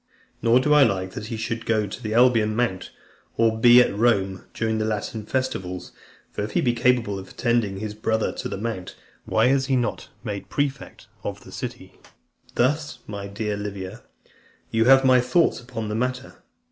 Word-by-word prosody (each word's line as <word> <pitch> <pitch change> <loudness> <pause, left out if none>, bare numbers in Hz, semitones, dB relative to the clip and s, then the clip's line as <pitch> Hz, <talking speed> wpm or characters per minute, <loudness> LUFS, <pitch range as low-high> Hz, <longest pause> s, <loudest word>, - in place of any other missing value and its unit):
Nor 115 +2 +5
do 150 +3 +2
I 150 - +7
like 95 -7 +2
that 105 +3 -7
he 115 -1 -4
should 115 +1 -3
go 110 -2 +1
to 100 +5 -8
the 110 -2 -3
Alban 115 -3 +4
Mount, 115 -6 -1 0.5
or 110 -1 +2
be 120 +1 +8
at 100 - -3
Rome 100 -4 +1
during 110 -1 -1
the - - 0
Latin 110 0 -3
festivals. 95 -9 -3 0.4
For - - -4
if 105 0 -5
he - - +2
be 120 -2 +2
capable 120 -4 +1
of 95 - -10
attending 115 -5 0
his 105 +1 -5
brother 110 +1 0
to - - -5
the - - -4
mount, 105 -4 -5 0.3
why - - +2
is 135 0 +2
he 135 - +2
not 120 -2 -2
made 105 -4 -5
prefect 140 -1 -3 0.2
of - - -5
the - - -13
city? - - -7 0.6
Thus, 145 +3 +1
my 100 -1 -6
dear 105 +1 -3
Livia, 100 +1 -6 0.7
you 115 0 +2
have 135 +1 +6
my 130 -1 +6
thoughts 125 +7 +2
upon 120 -3 -6
the 105 - -3
matter. 125 +3 -3
115 Hz, 185 wpm, -24 LUFS, 105-125 Hz, 0.7 s, be